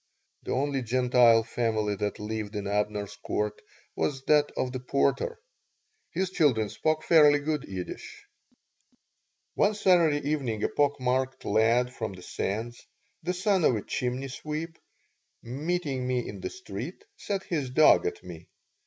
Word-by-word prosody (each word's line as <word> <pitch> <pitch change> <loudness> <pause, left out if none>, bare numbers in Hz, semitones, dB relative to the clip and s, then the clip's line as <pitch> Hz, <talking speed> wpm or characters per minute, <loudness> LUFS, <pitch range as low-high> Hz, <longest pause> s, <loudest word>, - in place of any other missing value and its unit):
The - - -6
only 135 +1 0
Gentile 120 -1 +4
family 110 -2 -1
that 105 +1 -2
lived 105 0 -5
in 105 -1 -3
Abner's 105 0 -2
Court 105 0 -3 0.3
was 135 -2 -1
that 150 0 +4
of 125 - -1
the 130 - -4
porter. 140 - 0 0.7
His 185 0 -2
children 130 - +2
spoke 155 0 -1
fairly 150 -3 +6
good 150 0 -2
Yiddish 95 -2 -7 1.3
One 210 - +2
Saturday 165 -8 +3
evening 130 -8 -1
a - - +2
pock 145 -1 +1
marked 130 +1 -1
lad 115 +4 +2
from 110 -5 -4
the 90 -1 -12
Sands, 115 +7 -4 0.4
the 175 +2 -1
son 190 0 +1
of 125 - +4
a 105 - -3
chimney 130 +2 -2
sweep, 155 +4 -5 0.6
meeting 140 0 -2
me 125 -1 -1
in - - -7
the 370 - -3
street, 380 +3 -7
set 200 - -3
his 150 -7 -2
dog 155 - +5
at 425 -1 -5
me. - - -10
130 Hz, 145 wpm, -28 LUFS, 115-155 Hz, 1.3 s, fairly